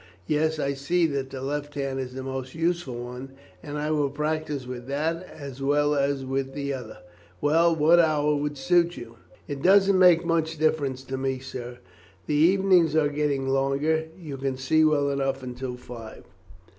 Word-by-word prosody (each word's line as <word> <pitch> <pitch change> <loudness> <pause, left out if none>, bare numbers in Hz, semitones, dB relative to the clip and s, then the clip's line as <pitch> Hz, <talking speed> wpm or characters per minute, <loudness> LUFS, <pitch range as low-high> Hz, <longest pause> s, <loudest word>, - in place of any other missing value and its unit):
Yes, 155 - +1
I 140 -2 -1
see 165 +6 +1
that 140 -4 -2
the 135 -1 -7
left 145 +1 -4
hand 135 -1 -2
is 130 -1 -5
the 130 - -5
most 130 0 -5
useful 165 -5 -1
one, 125 +2 -8 0.3
and 145 0 -6
I 150 +1 -1
will 145 -2 +1
practice 150 -1 -2
with 125 -1 -7
that 155 +5 -1
as 140 -3 -9
well 145 +2 +2
as 140 -1 0
with 135 0 -3
the 140 -1 -2
other. 125 -5 -7 0.4
Well, 165 +3 +3
what 160 +3 +5
hour 150 -2 +3
will 145 0 -2
suit 170 +5 +2
you?" 115 -1 -10 0.3
"It 140 -1 -5
don't 195 +1 +5
make 180 -2 +6
much 165 -1 0
difference 145 -4 0
to 130 0 -5
me, 135 0 -1
sir; 125 -2 -8 0.5
the - - -2
evenings 175 0 +4
are 155 -2 +3
getting 145 -2 -1
longer; 135 +4 +1
you 150 -6 -7
can 135 -1 -2
see 155 +4 +2
well 145 -2 +3
enough 135 -1 -1
until 125 0 -5
five." 115 -3 -10
145 Hz, 180 wpm, -26 LUFS, 135-155 Hz, 0.5 s, make